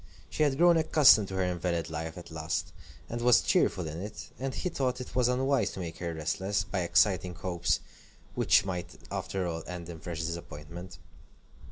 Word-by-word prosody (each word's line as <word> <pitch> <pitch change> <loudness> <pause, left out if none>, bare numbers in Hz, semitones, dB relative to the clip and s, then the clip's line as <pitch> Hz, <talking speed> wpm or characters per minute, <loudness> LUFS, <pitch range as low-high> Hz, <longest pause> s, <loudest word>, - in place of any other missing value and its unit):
She - - -3
had 145 -3 +3
grown 170 +1 +6
accustomed 145 -9 +6
to 95 - -6
her 95 - +1
invalid 85 -2 -1
life 80 0 -4
at 85 -1 -10
last, 80 0 -3 0.3
and 120 0 -4
was 120 -1 +6
cheerful 90 -3 +2
in 80 +3 -5
it, 105 +3 -7
and 135 +1 -2
he - - -2
thought 130 -6 -1
it 125 - -8
unwise 130 +2 +2
to - - -7
make 85 -3 -6
her 85 -1 -3
restless, 95 +6 -1
by 100 -1 -3
exciting 90 0 +2
hopes 85 -2 0 0.5
which - - +4
might 90 -2 -4 0.2
after 95 -1 -2
all 80 -1 -3
end 90 -1 -6
in 85 -2 -7
fresh 85 0 -5
disappointment. 85 +1 -7
90 Hz, 180 wpm, -30 LUFS, 85-120 Hz, 0.5 s, grown